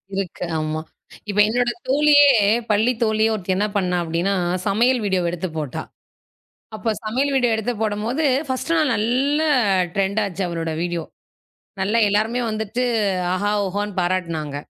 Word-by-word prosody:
இருக்கு, 190 -2 -3
ஆமா. 155 0 -2 0.5
இப்ப 205 0 -1
என்னோட 245 +2 +1 0.2
தோழியே 290 +1 +5 0.4
பள்ளி 215 +4 +3
தோழியே 220 0 +2
ஒருத்தி 190 -2 -2
என்ன 205 - +1
பண்ணா 180 -2 0
அப்டின்னா, 170 +4 -1 0.3
சமையல் 235 +5 +2
வீடியோவ 185 -3 0
எடுத்துப் 170 -2 -5
போட்டா. 150 -5 -4 0.9
அப்ப 220 0 -1
சமையல் 260 +6 0
வீடியோ 245 -3 +2
எடுத்துப் 220 0 -3
போடும்போது, 220 +7 -1 0.2
ஃபர்ஸ்ட்டு 265 +5 -1
நாள் 305 -4 +2
நல்ல 255 +8 +1 0.5
டிரெண்ட் 200 +2 0
ஆச்சு 195 -1 -4
அவளோட 165 -1 -3
வீடியோ. 175 -1 -2 0.8
நல்லா 200 +4 +1
எல்லாருமே 220 +4 +1
வந்துட்டு 220 +3 -2 0.5
ஆஹா! 205 +3 0
ஓஹோன்னு 205 +2 -3
பாராட்டுனாங்க. 170 -5 -2
205 Hz, 135 wpm, -21 LUFS, 185-240 Hz, 0.9 s, தோழியே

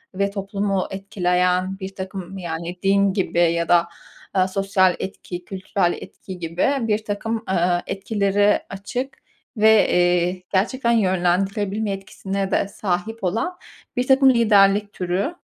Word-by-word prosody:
ve 200 +1 0
toplumu 195 -1 -2
etkileyen 185 0 0
birtakım, 190 0 -7
yani, 170 0 -5
din 200 0 +3
gibi 190 -3 -1
ya 170 -1 +2
da, 170 -1 +4 0.5
eee, 185 0 +3
sosyal 190 -2 +2
etki, 180 -2 -6
kültürel 190 -2 -1
etki 185 -2 -10
gibi 165 +1 -1 0.2
birtakım, 220 +1 -2
eee, 175 -1 +2
etkileri 205 +1 +1
açık 245 +7 -5 0.4
ve, 220 0 +5
eee, 180 +1 +2
gerçekten 235 +5 +1
yönlendirebilme 195 +1 +1
etkisine 195 0 -4
de - - +1
sahip 200 +3 -3
olan 230 - -1 0.4
birtakım 265 +2 +5
liderlik 205 -3 +4
türü 185 - -2
195 Hz, 115 wpm, -22 LUFS, 180-205 Hz, 0.5 s, ve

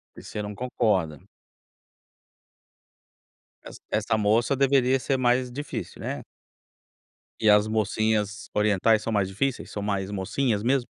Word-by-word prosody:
E - - -11
você 105 - -5
não 105 0 -5
concorda. 100 - -1 2.4
Essa - - -11
essa 110 +1 0
moça 110 +6 +2
deveria 135 -1 +3
ser 135 +2 0
mais 125 0 +2
difícil, 145 +4 -6
né. - - -4 1.2
E 110 - +4
as 105 +1 +5
mocinhas 110 -1 -1
orientais 105 +1 +3
são 115 - -3
mais 100 -3 +1
difíceis, 120 +7 -2
são 105 - -4
mais 100 -1 -2
"mocinhas" 105 +3 -1
mesmo? 125 +1 +1
110 Hz, 125 wpm, -26 LUFS, 105-125 Hz, 2.4 s, as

